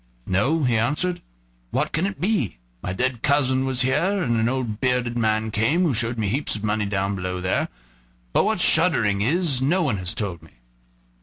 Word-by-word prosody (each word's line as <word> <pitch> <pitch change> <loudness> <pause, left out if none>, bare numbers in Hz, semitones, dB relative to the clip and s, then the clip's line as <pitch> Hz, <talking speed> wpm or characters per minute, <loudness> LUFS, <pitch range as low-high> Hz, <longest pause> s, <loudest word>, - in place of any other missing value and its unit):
"No," 135 +12 +1
he 120 -3 +2
answered; 150 +10 -1 0.5
"what - - -1
can 165 +6 0
it 195 - -6
be? 175 - 0 0.2
My - - -4
dead 125 +4 -1
cousin 135 -2 +2
was 130 -1 0
here, 185 +9 +1
and 120 -4 0
an 115 +1 +1
old 125 -5 -3
bearded 125 -2 0
man 110 -1 0
came, 115 - +2
who 160 -6 +2
showed 120 +1 0
me 110 -2 -1
heaps 140 +8 +1
of 105 - -6
money 105 -1 0
down 100 0 -1
below 90 -1 -3
there, 95 +1 0 0.7
but - - +4
what - - 0
shuddering 100 -1 +3
is 145 - +1
no 170 +7 +2
one 130 -10 0
has 90 -1 -3
told 95 -6 -3
me." 80 - -18
120 Hz, 190 wpm, -23 LUFS, 105-145 Hz, 0.7 s, but